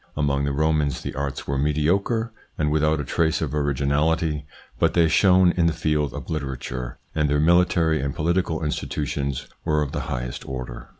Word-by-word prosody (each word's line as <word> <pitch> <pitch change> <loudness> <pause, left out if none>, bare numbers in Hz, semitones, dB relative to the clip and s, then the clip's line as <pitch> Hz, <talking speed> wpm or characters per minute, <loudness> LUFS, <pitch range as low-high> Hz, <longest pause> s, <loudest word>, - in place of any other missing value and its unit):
Among 70 -1 +1
the 70 - 0
Romans 75 -1 +1
the - - -5
arts 70 0 -4
were 70 -1 -1
mediocre 95 - +1 0.2
and 75 -1 +1
without 75 0 +2
a - - -2
trace 80 +4 +1
of - - -3
originality, 75 +2 0 0.3
but - - +2
they 85 -1 +5
shone 90 +1 +5
in 85 -2 +2
the 85 - +1
field 75 -3 0
of - - -7
literature, 65 -4 -4 0.2
and 75 -2 +1
their 75 0 +2
military 80 -1 +3
and 70 0 -3
political 85 0 0
institutions 70 -2 -3 0.2
were 75 -1 +1
of 70 - -5
the 75 - -3
highest 60 -3 -4
order. 65 -2 -6
75 Hz, 175 wpm, -24 LUFS, 70-80 Hz, 0.3 s, they